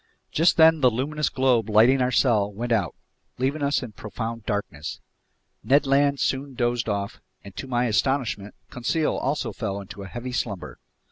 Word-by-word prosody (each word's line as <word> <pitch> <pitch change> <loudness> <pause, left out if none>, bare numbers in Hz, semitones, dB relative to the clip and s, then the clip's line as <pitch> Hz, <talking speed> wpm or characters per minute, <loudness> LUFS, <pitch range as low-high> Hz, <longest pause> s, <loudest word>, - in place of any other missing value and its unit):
Just 165 +3 +3
then 160 -1 +6
the 130 - +6
luminous 145 +6 -1
globe 125 -4 +2
lighting 115 +5 +5
our 125 - +2
cell 110 -6 +2
went 120 +4 -5
out, 100 -8 +1 0.4
leaving 135 +4 -1
us 140 -1 +1
in 120 - -7
profound 110 +2 -6
darkness. 100 -8 -4 0.6
Ned 140 +3 +3
Land 140 +1 +2
soon 135 0 -1
dozed 120 -1 0
off, 100 -1 -3 0.2
and 100 -1 -12
to 135 - -5
my 125 -1 +1
astonishment, 115 -3 0 0.2
Conseil 150 +6 0
also 140 +3 -2
fell 100 -4 -4
into 100 0 -9
a 95 - -7
heavy 120 +4 -6
slumber. 105 -6 -4
120 Hz, 165 wpm, -24 LUFS, 105-135 Hz, 0.6 s, then